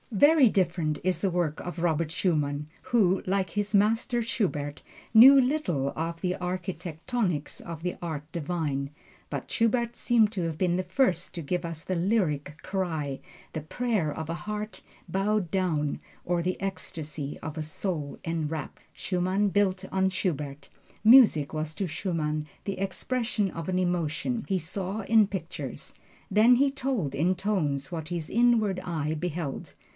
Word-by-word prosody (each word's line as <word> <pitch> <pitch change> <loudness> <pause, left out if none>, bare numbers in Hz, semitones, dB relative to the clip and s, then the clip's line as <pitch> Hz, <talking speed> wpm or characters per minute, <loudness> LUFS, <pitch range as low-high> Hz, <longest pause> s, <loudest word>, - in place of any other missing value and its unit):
Very 285 +4 +6
different 170 -6 +1
is 185 -3 +1
the 195 - +1
work 170 -4 -1
of 175 0 -6
Robert 165 -2 +1
Schumann, 150 -5 0 0.2
who, 195 -6 +3
like 190 -1 0
his 205 0 -2
master 225 +4 +3
Schubert, 155 -11 -2 0.3
knew 265 +5 +10
little 250 - +1
of 165 +1 -3
the 180 0 0
architectonics 180 - -3
of 165 -2 -7
the 180 - -2
Art 155 -3 -5
Divine. 150 -4 -2 0.4
But - - -5
Schubert 235 +1 +1
seems 225 -4 +3
to 200 -5 -3
have 165 -2 -2
been 175 -1 +1
the 185 - 0
first 180 -2 +1
to 170 - -4
give 175 +4 -2
us 165 -1 -5
the 185 - -2
"lyric 170 -6 0
cry" 160 -8 -2 0.3
the 155 - -3
prayer 205 -1 -1
of 160 +1 -5
a - - -1
heart 210 +4 -5 0.3
bowed 195 +1 0
down, 160 -6 0 0.3
or 175 -1 +1
the 180 +2 -2
ecstasy 155 -6 -5
of 155 +1 -6
a 155 - -2
soul 155 -2 -4
enrapt. 160 -3 -3
Schumann 185 +2 0
built 190 0 +1
on 190 0 +3
Schubert. 150 -7 -3 0.4
Music 220 - +7
was 155 0 -2
to 195 - -2
Schumann 155 -3 -2 0.2
the 195 -2 -3
expression 210 +2 -1
of 165 +1 -5
an 185 0 +1
emotion. 180 +6 -1
He 195 - +1
saw 190 +5 -3
in 220 0 +4
pictures, 195 -2 -6 0.4
then 220 +5 +6
he 275 +3 +4
told 255 - -2
in 175 +5 +2
tones, 155 -9 -1
what 160 -1 -4
his 170 -3 -3
inward 225 -5 +3
eye 155 -3 -2
beheld. 160 -3 -4
180 Hz, 155 wpm, -28 LUFS, 155-205 Hz, 0.4 s, knew